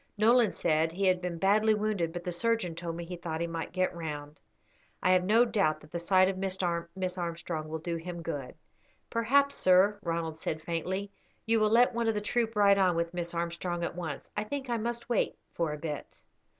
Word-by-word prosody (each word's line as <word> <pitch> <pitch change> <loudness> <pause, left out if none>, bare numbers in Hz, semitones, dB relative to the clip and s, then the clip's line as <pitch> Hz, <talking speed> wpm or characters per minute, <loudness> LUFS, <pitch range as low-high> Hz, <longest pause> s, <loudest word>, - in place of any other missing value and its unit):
Nolan 230 +1 +5
said 160 -1 +1
he 195 +4 -1
had 185 -1 +3
been 175 -2 -3
badly 210 +4 +4
wounded, 210 -6 -1
but 175 +1 -6
the 180 - -3
surgeon 220 -1 0
told 165 0 -5
me 170 0 -5
he 180 +1 -6
thought 165 -2 -4
he 170 - 0
might 165 -1 -4
get 185 0 0
round. 150 -3 -6 0.6
I 185 - +4
have 185 -1 +4
no 220 +6 +5
doubt 195 -10 +1
that 150 - -16
the 170 - -3
sight 185 +2 +4
of 190 -1 -2
Miss 190 -1 -1 0.6
Armstrong 170 -2 -4
will 160 - -3
do 170 +1 -3
him 170 0 -6
good." 145 -6 -5 0.6
"Perhaps, 275 +5 +3
sir," 190 +3 +4
Ronald 165 -2 -3
said, 155 -1 -3
faintly, 190 +4 -3 0.3
"you 225 0 +3
will 215 0 +3
let 240 +3 +5
one 235 0 0
of 225 - +2
the - - +1
troop 225 +2 -1
ride 200 -1 +5
on 185 -3 +3
with 170 +1 -1
Miss 175 -1 -4
Armstrong 170 +1 -2
at - - -2
once. 160 -6 -6
I 210 - -1
think 265 +3 -4
I 235 - +1
must 235 +1 -3
wait 240 - +1 0.2
for 165 -3 -1
a 150 - -4
bit." 150 -1 -6
180 Hz, 215 wpm, -30 LUFS, 165-210 Hz, 0.6 s, Nolan